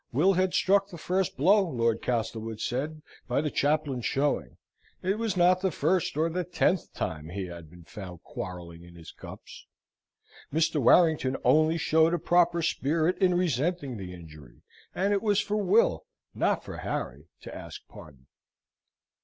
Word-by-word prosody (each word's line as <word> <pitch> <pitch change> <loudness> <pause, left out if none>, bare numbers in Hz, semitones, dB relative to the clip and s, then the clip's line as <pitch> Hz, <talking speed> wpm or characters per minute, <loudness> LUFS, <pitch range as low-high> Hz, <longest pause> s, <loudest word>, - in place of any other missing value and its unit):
Will 170 +10 +3
had 185 0 +1
struck 195 +1 +3
the 175 - -9
first 185 +3 -1
blow, 195 +9 +5
Lord 115 - 0
Castlewood 115 -2 -3
said, 150 +5 -3 0.2
by 125 - 0
the 150 0 -1
chaplain's 145 -5 0
showing. 135 - -1 0.5
It 195 +4 0
was 225 -5 -1
not 180 +1 +4
the 190 - +1
first 165 0 0
or 160 +2 +2
the 180 +2 -2
tenth 175 0 0
time 80 0 -4
he 95 +2 -4
had 85 -3 -10
been 85 +1 -15
found 90 -1 -10
quarrelling 85 -2 -8
in 85 0 -15
his 85 -2 -11
cups. - - -12 0.8
Mr. 160 -1 +1
Warrington 150 -2 +4
only 155 +2 +4
showed 160 +1 +3
a - - 0
proper 170 0 +2
spirit 160 +3 +1
in 185 -2 +3
resenting 160 -5 -1
the 95 -2 -7
injury, 75 -7 -13 0.3
and 200 +2 +1
it 200 - +1
was 210 -2 +2
for 210 +1 -1
Will, 195 - +2 0.3
not - - 0
for - - -8
Harry, 70 +6 -5
to - - -9
ask - - -10
pardon. 70 -4 -14
155 Hz, 160 wpm, -28 LUFS, -, 0.8 s, blow